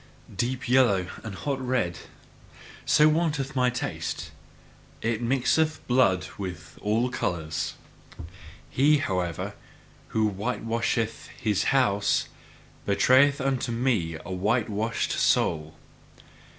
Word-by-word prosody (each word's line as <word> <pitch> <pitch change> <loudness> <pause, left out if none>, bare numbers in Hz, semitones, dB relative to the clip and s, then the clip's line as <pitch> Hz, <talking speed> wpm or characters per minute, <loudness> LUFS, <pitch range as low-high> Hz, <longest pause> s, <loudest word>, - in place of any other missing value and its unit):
Deep 125 +1 -2
yellow 120 -7 +4 0.2
and 110 -4 -6
hot 135 +3 -3
red 120 -9 -1 0.9
so 150 - +6
wanteth 150 -4 0
MY 125 -1 +3
taste 125 - -4 0.7
it 115 0 0
mixeth 135 +6 +1
blood 95 -8 +3
with 90 -5 -7
all 115 +4 +1
colours. 80 -10 -2 1.0
He, 150 +3 +4
however, 90 - -2 0.5
who 110 -1 +1
whitewasheth 115 +2 -2
his 105 -3 0
house, 105 -7 +2 0.6
betrayeth 130 +8 +4
unto 135 -2 -1
me 115 -10 0
a 95 - -7
whitewashed 110 +3 0
soul. 80 -1 +1
115 Hz, 100 wpm, -26 LUFS, 95-130 Hz, 1.0 s, so